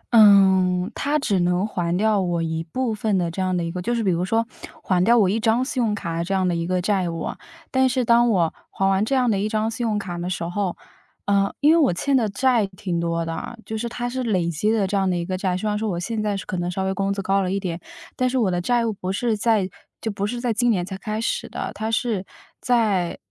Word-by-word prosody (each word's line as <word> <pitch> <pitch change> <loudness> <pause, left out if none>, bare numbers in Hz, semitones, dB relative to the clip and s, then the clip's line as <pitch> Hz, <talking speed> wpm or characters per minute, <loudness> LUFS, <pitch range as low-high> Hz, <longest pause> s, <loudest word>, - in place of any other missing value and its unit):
嗯， 190 -2 +5
它 295 +2 0
只 205 -10 0
能 180 +3 +1
还 175 -4 -1
掉 210 0 +2
我 175 -2 -1
一 160 0 -2
部 230 +7 -2
分 210 -2 0
的 170 -2 0
这 190 - -4
样 185 -1 0
的 170 - -1
一 165 - -3
个 180 0 -4
就 240 +6 -1
是 230 - -1
比 190 - +2
如 175 +1 0
说， 225 +4 +1 0.4
还 180 -1 +2
掉 235 +4 +5
我 200 -4 +4
一 215 +4 +1
张 230 +3 +2
信 260 -2 -2
用 210 -2 +1
卡 170 -4 -3
这 195 +2 -1
样 185 -1 +1
的 175 - +1
一 170 0 -2
个 185 0 +1
债 190 -3 +1
务。 165 -1 -4 0.5
但 260 0 +3
是 255 -1 0
当 235 +1 +5
我 175 -6 +2 0.2
还 195 - 0
完 195 +1 +2
这 270 +5 0
样 250 -3 +3
的 195 - +1
一 210 +2 -1
张 220 +1 0
信 235 +2 -4
用 210 - 0
卡 180 -4 -4
的 175 +1 -3
时 180 - -3
候， 180 +1 -2 0.5
呃， 200 0 +2
因 295 +2 +6
为 335 - +5
我 280 - +4
欠 275 +8 +1
的 225 -5 +2
债 230 0 +2
挺 185 -2 -4
多 170 0 -1
的， 165 +8 -5
就 220 - -5
是 235 +2 -3
它 240 +1 -4
是 260 +1 -3
累 190 -8 0
积 170 +7 0
的 215 -3 +2
这 200 +2 -2
样 190 -1 +2
的 180 - 0
一 170 - -2
个 185 +1 -2
债。 185 -1 -1
虽 215 +3 -3
然 210 - 0
说 220 -1 -1
我 175 -2 -2
现 215 +4 -3
在 205 -2 -1
是 - - -7
可 185 - -4
能 175 0 -2
稍 190 +2 -2
微 190 0 0
工 195 +1 -1
资 200 -1 -3
高 195 +1 +2
了 185 -1 -1
一 195 - 0
点， 170 -3 -4 0.3
但 255 0 +1
是 260 - -1
我 215 -6 +2
的 175 0 -1
债 240 +4 +1
务 225 - -1
不 185 -1 -4
是 225 +3 0
在 210 -3 +2 0.3
就 220 - -3
不 200 0 -2
是 240 +2 -4
在 240 -2 0
今 240 +3 +2
年 185 -6 +1
才 190 +1 -6
开 215 +2 -4
始 230 - -2
的， - - -4
它 220 +1 -3
是 220 -4 0 0.4
在 210 -8 +1
200 Hz, 295 characters per minute, -23 LUFS, 180-225 Hz, 0.5 s, 因